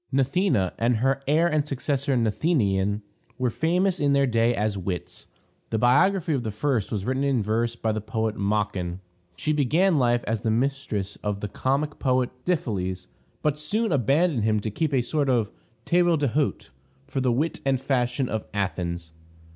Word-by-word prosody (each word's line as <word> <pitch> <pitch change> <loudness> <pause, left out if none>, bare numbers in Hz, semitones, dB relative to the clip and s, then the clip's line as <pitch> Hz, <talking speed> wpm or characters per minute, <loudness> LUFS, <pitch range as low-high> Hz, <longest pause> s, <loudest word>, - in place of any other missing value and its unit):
Gnathena, 135 - +1
and 120 +1 +2
her 135 +4 +1
heir 155 +4 +3
and 155 -3 0
successor, 140 0 -1
Gnathenion, 105 - +1 0.3
were 125 -2 0
famous 180 - +1
in 145 -1 +2
their 140 0 +4
day 115 -1 +2
as 105 -1 0
wits; 90 -2 -5 0.4
the 110 - 0
biography 160 - +3
of 135 - 0
the 115 - -3
first 110 0 -1
was 100 -3 -2
written 130 +2 0
in 135 -6 +1
verse 115 +3 0
by 110 -2 -1
the 110 0 -2
poet 110 0 -2
Machon. 100 -3 -1 0.4
She 150 +13 -1
began 155 +4 +3
life 120 -1 +2
as 110 -1 -1
the 115 - 0
mistress 115 -4 -1
of 105 -1 -3
the 105 - -2
comic 140 +7 -1
poet 130 -2 +1
Dyphiles, 95 - -1 0.4
but 150 -1 +1
soon 215 +8 0
abandoned 140 - +2
him 110 -1 +2
to 110 - -3
keep 155 +7 -1
a 130 -3 +2
sort 145 +2 0
of 115 -5 +1 0.3
table 175 -1 +3
d'hôte 145 0 -1 0.4
for 135 - -3
the 130 -1 +2
wit 150 +8 -1
and 135 -2 +1
fashion 125 -1 0
of 110 -2 -3
Athens. 85 -4 -3
125 Hz, 170 wpm, -25 LUFS, 110-145 Hz, 0.4 s, their